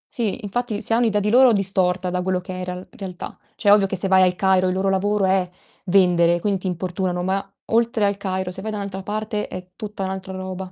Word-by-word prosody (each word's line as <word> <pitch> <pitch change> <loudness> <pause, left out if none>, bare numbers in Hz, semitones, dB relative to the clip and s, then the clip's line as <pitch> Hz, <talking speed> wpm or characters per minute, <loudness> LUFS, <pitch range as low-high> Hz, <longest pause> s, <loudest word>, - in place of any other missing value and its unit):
Sì, 230 -1 -1
infatti 215 +1 -2
si 225 - -2
ha - - +4
un'idea 220 -4 +2
di 210 +1 0
loro 250 -1 +7
distorta, 185 -2 +1
da 180 0 -1
quello 185 0 0
che 180 +1 -8
è - - -6
in - - -4
real 180 +1 -6
realtà. 185 -3 -7 0.2
Cioè, 205 -2 +3
ovvio 205 -2 +6
che 190 - -3
se 190 +2 -2
vai 190 0 +5
al 180 -1 +3
Cairo, 190 -1 +3
il 185 - +1
loro 195 +1 +1
lavoro 200 +1 +1
è 190 -1 +2 0.4
vendere, 175 -2 +4
quindi 195 +1 0
ti 185 - -4
importunano, 180 0 -2
ma 195 +1 -2 0.2
oltre 230 -2 +2
al 200 0 +1
Cairo, 190 -2 -3
se 190 - -8
vai 220 - -4
da 210 - -3
n'altra 195 -1 -5
parte 210 +1 -3
è 185 0 -8
tutta 210 -3 -5
n'altra 190 0 -5
roba. 185 0 -6
190 Hz, 240 wpm, -22 LUFS, 185-205 Hz, 0.4 s, loro